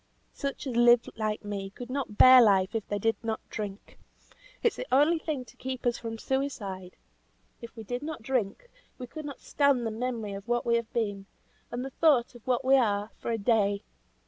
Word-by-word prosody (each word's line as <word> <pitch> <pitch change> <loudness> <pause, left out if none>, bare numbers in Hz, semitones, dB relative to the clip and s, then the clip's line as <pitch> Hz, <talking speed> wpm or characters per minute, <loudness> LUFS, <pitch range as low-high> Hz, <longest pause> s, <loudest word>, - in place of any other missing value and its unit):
Such 280 +1 -4
as 255 -3 -4
live 240 0 +5
like 215 -1 -3
me 200 -1 -4
could 245 +5 -9
not 260 -6 -4
bear 255 0 +9
life 195 -3 +4
if 225 -2 -3
they 205 - -2
did 225 +2 0
not 220 -1 -2
drink. 205 -2 -7 0.6
It's 465 - +2
the - - -6
only 300 +5 +4
thing 300 -5 -4
to - - -17
keep 260 -1 -6
us 240 -1 +1
from 225 -1 -5
suicide. 210 -9 -3 0.7
If 235 0 -10
we 225 - -8
did 245 +4 -4
not 300 -6 -6
drink, 250 - -2 0.3
we 255 - -6
could 305 +5 -8
not 285 -2 -8
stand 280 -4 +2
the 225 - -1
memory 225 -2 -3
of 195 +2 -8
what 240 0 0
we 235 - +2
have 235 -1 -5
been, 205 -4 -2 0.4
and 245 +2 -4
the 270 - -6
thought 270 -6 +3
of 240 -1 -16
what 250 0 +1
we 270 +1 +6
are, 210 -4 +1
for - - -5
a 230 - 0
day. 200 -2 +1
235 Hz, 205 wpm, -28 LUFS, 210-260 Hz, 0.7 s, bear